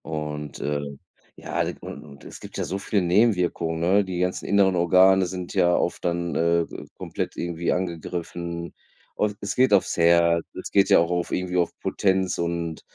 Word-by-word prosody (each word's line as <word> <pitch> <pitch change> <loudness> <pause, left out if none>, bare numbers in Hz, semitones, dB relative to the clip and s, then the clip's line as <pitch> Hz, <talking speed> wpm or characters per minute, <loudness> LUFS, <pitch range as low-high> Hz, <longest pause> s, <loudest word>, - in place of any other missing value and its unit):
Und 75 -2 -5
äh, 75 0 -2 0.5
ja, - - -3 0.2
und - - -8
und 70 -2 -14
es - - -10
gibt - - -10
ja - - -1
so 95 - -3
viele 100 0 0
Nebenwirkungen 90 -4 +1
ne, 95 +5 +3
die 95 -2 -5
ganzen 90 0 -1
inneren 100 -2 +3
Organe 95 +2 +5
sind 90 -1 -6
ja 90 0 +3
oft - - -1
dann, 85 0 -1
äh, 85 0 +2 0.3
komplett - - -5
irgendwie 85 0 -2
angegriffen. 85 -1 -4 0.4
Und 105 -1 -1
es 100 - -3
geht 130 -4 +4
aufs 100 - +3
Herz, 85 0 +4
es - - -7
geht 100 -1 +4
ja - - +7
auch 85 +1 +1
auf 90 -1 -1
irgendwie 90 0 -2
auf 85 - +1
Potenz 95 -2 0
und 85 -1 -3
85 Hz, 175 wpm, -24 LUFS, 85-95 Hz, 0.5 s, ja